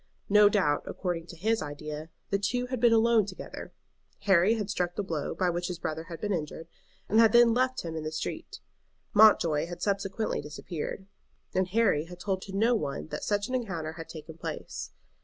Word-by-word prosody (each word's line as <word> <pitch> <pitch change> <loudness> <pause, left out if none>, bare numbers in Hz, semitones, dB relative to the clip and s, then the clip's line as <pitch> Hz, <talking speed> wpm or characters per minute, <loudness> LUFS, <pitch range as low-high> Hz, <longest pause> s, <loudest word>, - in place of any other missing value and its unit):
No 210 0 +7
doubt, 165 -9 +2
according 175 -3 -3
to 170 - -10
his 220 +7 0
idea, 150 +1 -6 0.2
the 200 - +2
two 245 +5 0
had 255 -1 -3
been 240 0 +5
alone 225 -2 +4
together. 185 - -8 0.5
Harry 195 +2 +4
had 210 -3 -3
struck 180 -4 -1
the 205 - -1
blow 160 -6 -3
by 180 -2 +1
which 175 +1 -2
his 180 - -4
brother 160 0 -4
had 165 -2 -8
been 205 +2 -1
injured, 165 -1 -4 0.4
and 220 - +3
had 225 -1 +6
then 240 -1 +7
left 255 +1 +1
him 165 -1 -5
in 160 - -4
the 155 - -3
street. 325 - -5 0.5
Mountjoy 170 -8 +5
had 175 0 -7
subsequently 200 +1 -1
disappeared, 155 +5 -6 0.5
and 185 0 +1
Harry 195 -7 +2
had 175 +1 -11
told 190 0 -2
to 195 - -8
no 230 +4 +4
one 155 -8 -2
that - - -5
such 205 -1 0
an 255 - -6
encounter 180 -11 -2
had 165 0 -9
taken 160 0 -10
place. - - -5
185 Hz, 195 wpm, -29 LUFS, 165-220 Hz, 0.5 s, No